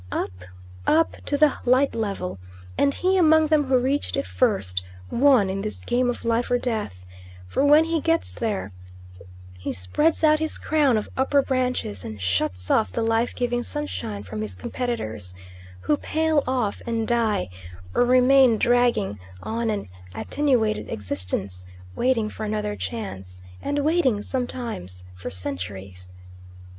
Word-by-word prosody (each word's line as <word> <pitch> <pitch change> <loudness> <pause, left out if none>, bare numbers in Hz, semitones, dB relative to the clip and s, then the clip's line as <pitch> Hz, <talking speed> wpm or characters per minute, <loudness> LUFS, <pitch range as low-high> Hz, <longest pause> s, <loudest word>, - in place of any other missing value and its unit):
Up, - - -2 0.6
up 325 +1 +3
to 285 - +1
the 300 -1 +5
light 255 +3 +3
level, 195 - -3 0.4
and 280 - +3
he 370 +6 +1
among 315 -2 +5
them 305 -1 +3
who 260 -1 +3
reached 270 +4 0
it 275 - -1
first 95 - 0 0.3
won 260 -6 +5
in 190 +1 -2
this 215 +1 -4
game 245 +1 +1
of 245 - -4
life 230 +1 +1
or 245 - +3
death; 215 - -3 0.4
for 90 - 0
when 295 +2 +7
he 325 -1 -1
gets 330 +1 +1
there 210 - -2 0.9
he 90 - -3
spreads 300 - 0
out 310 0 +5
his 315 0 -2
crown 290 -6 +2
of 210 - -2
upper 275 +1 +3
branches, 250 - -1
and 110 -1 -7
shuts 90 0 -1
off 95 - +3
the - - -1
life 225 +1 +1
giving 245 0 0
sunshine 100 - -4
from 105 +2 -6
his 105 -3 -5
competitors, 110 - -4 0.5
who 120 +11 +2
pale 315 - +1
off 250 -6 -1
and 225 -1 -1
die, 225 - +1 0.5
or - - +4
remain 255 -1 +5
dragging 240 - +2 0.2
on 230 +1 -1
an 210 - -2 0.3
attenuated 220 - 0
existence 95 -2 -4 0.3
waiting 245 -4 +1
for 215 - -7
another 210 -1 -2
chance, 95 - -6 0.2
and 285 - -2
waiting 285 -8 +2
sometimes 230 - -4
for 90 +1 -7
centuries. 90 0 -6
230 Hz, 150 wpm, -24 LUFS, -, 0.9 s, when